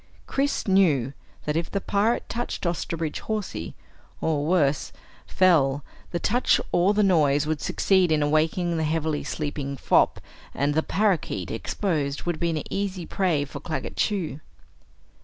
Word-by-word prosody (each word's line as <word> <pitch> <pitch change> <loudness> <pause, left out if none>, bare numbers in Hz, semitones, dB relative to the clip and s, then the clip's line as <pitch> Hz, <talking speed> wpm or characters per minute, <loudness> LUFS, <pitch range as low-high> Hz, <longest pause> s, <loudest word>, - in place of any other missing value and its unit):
Chris 280 -3 -1
knew 155 -10 +3 0.3
that 150 - -1
if 165 +1 -1
the 200 - -1
pirate 205 +4 0
touched 240 -4 -4
Osterbridge 165 -2 -2
Hawsey, 210 - -3 0.4
or 150 -2 0
worse, 150 -5 +2 0.4
fell, 145 -7 +3 0.3
the 175 - -2
touch 240 +8 +2
or 185 +4 +3
the 210 - +3
noise 150 -6 +3
would 155 -1 -2
succeed 190 -4 +2
in 150 -1 +3
awakening 160 +3 +1
the 160 - 0
heavily 155 -1 -1
sleeping 145 -2 -4
fop - - +3 0.4
and 145 +2 +1
the 160 - +2
parakeet, 180 - 0
exposed, 145 - -2
would 175 -2 -2
be 170 - +1
an 160 -2 -2
easy 195 -3 -2
prey 170 -8 0
for 140 0 -8
Claggett 155 +2 -4
Chew. 180 -8 -1
160 Hz, 145 wpm, -25 LUFS, 145-190 Hz, 0.4 s, knew